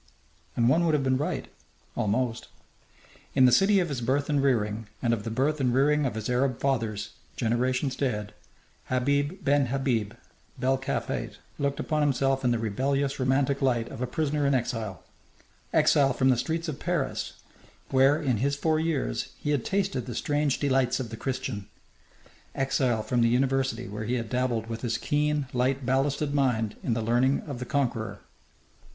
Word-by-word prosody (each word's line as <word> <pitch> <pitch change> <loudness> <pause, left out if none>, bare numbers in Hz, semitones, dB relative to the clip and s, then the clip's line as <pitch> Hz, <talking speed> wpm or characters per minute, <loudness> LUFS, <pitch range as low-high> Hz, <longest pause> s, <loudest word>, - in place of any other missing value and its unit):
And 120 -1 +3
one 160 +7 +4
would 160 -2 +3
have 140 - +1
been 130 -1 +2
right, 150 - -2 0.5
almost. 115 +3 -1 0.9
In 130 -2 +6
the 125 - +6
city 195 - +5
of 175 -3 0
his 135 -4 -3
birth 140 +5 0
and 145 -1 +2
rearing, 110 -5 0
and 120 -2 +1
of 110 -3 -2
the - - -2
birth 140 +6 0
and 125 -2 +2
rearing 145 +3 +3
of 120 - -4
his 110 -1 -3
Arab 125 0 +1
fathers 110 -6 -1 0.2
generations 130 +3 0
dead, 105 -7 -2 0.5
Habib 140 +8 0
ben 140 -1 +3
Habib 120 -5 -1 0.4
bel 130 +1 +1
Kalfate 135 +1 -3 0.2
looked 140 0 -1
upon 155 -1 0
himself 135 -1 +1
in 125 - +3
the 120 - +2
rebellious, 135 +6 -1
romantic 135 +2 +1
light 120 -4 +1
of - - -8
a 125 - 0
prisoner 150 +1 0
in 140 - +3
exile 115 -5 -3 0.7
exile 135 -2 +4
from 130 +1 +2
the 130 - +5
streets 165 +6 -2
of 155 - -4
Paris - - -2 0.6
where, 135 +3 +5
in 135 -7 0
his 140 +6 0
four 155 +2 +1
years, 160 -4 -1
he 150 - -2
had 140 -5 +1
tasted 195 -11 -1
the 120 - -5
strange 145 0 0
delights 135 -3 +1
of 120 -4 -5
the - - -4
Christian 125 -6 -4 0.9
exile 130 -4 +1
from 125 +1 0
the 115 - +4
university 130 -1 +1
where 105 +2 -5
he 120 +3 0
had 115 -3 -4
dabbled 125 -3 0
with 115 0 -6
his 115 -2 -1
keen, 150 +1 0
light 130 +1 0
ballasted 140 +3 +1
mind 120 -6 +1
in 115 - 0
the 115 - -1
learning 120 +4 +2
of 140 -5 -7
the 125 - -4
conqueror. 120 -5 -1
130 Hz, 175 wpm, -27 LUFS, 120-140 Hz, 0.9 s, In